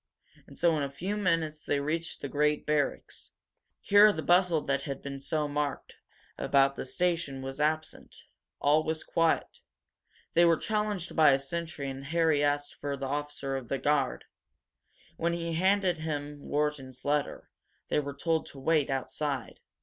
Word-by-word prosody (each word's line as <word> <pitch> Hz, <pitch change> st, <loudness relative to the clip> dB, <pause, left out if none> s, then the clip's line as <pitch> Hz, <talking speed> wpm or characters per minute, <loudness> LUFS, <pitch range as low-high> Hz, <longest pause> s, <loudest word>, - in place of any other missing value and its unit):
And -, -, -13 dB
so 170 Hz, -2 st, +3 dB
in -, -, -1 dB
a 140 Hz, -, -1 dB
few 180 Hz, +9 st, -4 dB
minutes 165 Hz, -6 st, 0 dB
they 145 Hz, -, 0 dB
reached 160 Hz, +4 st, -3 dB
the -, -, -3 dB
great 150 Hz, +1 st, +1 dB
barracks. 150 Hz, -2 st, -1 dB, 0.5 s
Here 205 Hz, +1 st, +7 dB
the 160 Hz, -6 st, -4 dB
bustle 175 Hz, -3 st, +4 dB
that 140 Hz, -1 st, -1 dB
had 140 Hz, -2 st, -5 dB
been 140 Hz, -1 st, -5 dB
so 150 Hz, +2 st, -1 dB
marked 145 Hz, 0 st, -3 dB, 0.4 s
about 140 Hz, 0 st, +3 dB
the -, -, -5 dB
station 165 Hz, -4 st, -1 dB
was 135 Hz, +1 st, -6 dB
absent. 155 Hz, +1 st, -2 dB, 0.4 s
All 150 Hz, +2 st, +3 dB
was 160 Hz, 0 st, -2 dB
quiet. 165 Hz, -1 st, 0 dB, 0.7 s
They 170 Hz, -, +5 dB
were 170 Hz, -1 st, +5 dB
challenged 210 Hz, -4 st, -2 dB
by 155 Hz, -4 st, +6 dB
a -, -, +4 dB
sentry 155 Hz, 0 st, -4 dB
and 135 Hz, 0 st, -6 dB
Harry 160 Hz, -1 st, +2 dB
asked 145 Hz, 0 st, 0 dB
for 140 Hz, -1 st, -4 dB
the 135 Hz, -, -4 dB
officer 140 Hz, -1 st, -3 dB
of 130 Hz, -3 st, -5 dB
the 135 Hz, -, -1 dB
guard. 140 Hz, -, 0 dB, 0.9 s
When 170 Hz, +1 st, 0 dB
he 170 Hz, -, -3 dB
came 170 Hz, 0 st, -3 dB
he 160 Hz, -, -1 dB
handed 190 Hz, -1 st, +3 dB
him 145 Hz, -2 st, -4 dB
Wharton's 145 Hz, -3 st, -3 dB
letter. 145 Hz, 0 st, -1 dB, 0.4 s
They -, -, +2 dB
were 140 Hz, -1 st, -4 dB
told 165 Hz, 0 st, 0 dB
to 140 Hz, -, -9 dB
wait 150 Hz, +1 st, +2 dB
outside. 135 Hz, +1 st, -3 dB
150 Hz, 170 wpm, -29 LUFS, 140-165 Hz, 0.9 s, Here